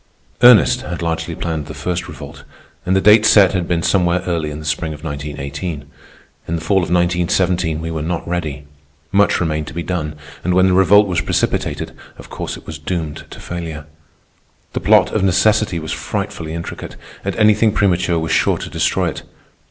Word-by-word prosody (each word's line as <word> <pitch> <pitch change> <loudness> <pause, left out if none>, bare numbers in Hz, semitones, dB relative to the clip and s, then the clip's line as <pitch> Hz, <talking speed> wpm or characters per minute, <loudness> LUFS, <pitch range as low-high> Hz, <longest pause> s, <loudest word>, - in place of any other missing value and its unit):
Ernest 120 -4 +6
had 85 +1 -5
largely 80 -1 -2
planned 80 -4 -3
the 75 - -8
First 90 0 -3
Revolt, - - -10 0.4
and 95 - +2
the 95 - +3
date 105 +2 +6
set 105 -3 +6
had 90 -3 -2
been 85 -1 0
somewhere 90 -2 +2
early 85 -4 -1
in 75 - -6
the 75 - -9
spring 80 +1 -2
of 75 - -15
1918. 75 +1 -5 0.6
In 85 - -1
the - - -2
fall 85 +5 +1
of 90 - 0
1917 90 -1 +1
we 80 0 -4
were 80 -1 -3
not 85 +2 -3
ready; 75 -5 -3 0.5
much 100 0 +3
remained 80 -3 -1
to - - -9
be 85 - -3
done, 80 -5 -3 0.3
and 90 +1 +1
when 95 0 +5
the 95 - +3
Revolt 95 +3 +6
was 90 -4 -1
precipitated, - - -1 0.3
of - - -13
course - - -5
it - - -15
was 80 -1 -7
doomed 80 -1 -4
to - - -11
failure. 80 -3 -6 0.9
The - - -1
plot - - +4
of 110 - 0
necessity 100 +1 +2
was 80 -1 -5
frightfully 80 0 -4
intricate, 85 - -7 0.3
and - - -3
anything 110 0 +4
premature 90 -4 +1
was 80 0 -2
sure - - +2
to - - -7
destroy - - 0
it. - - -7
85 Hz, 190 wpm, -18 LUFS, 80-95 Hz, 0.9 s, Ernest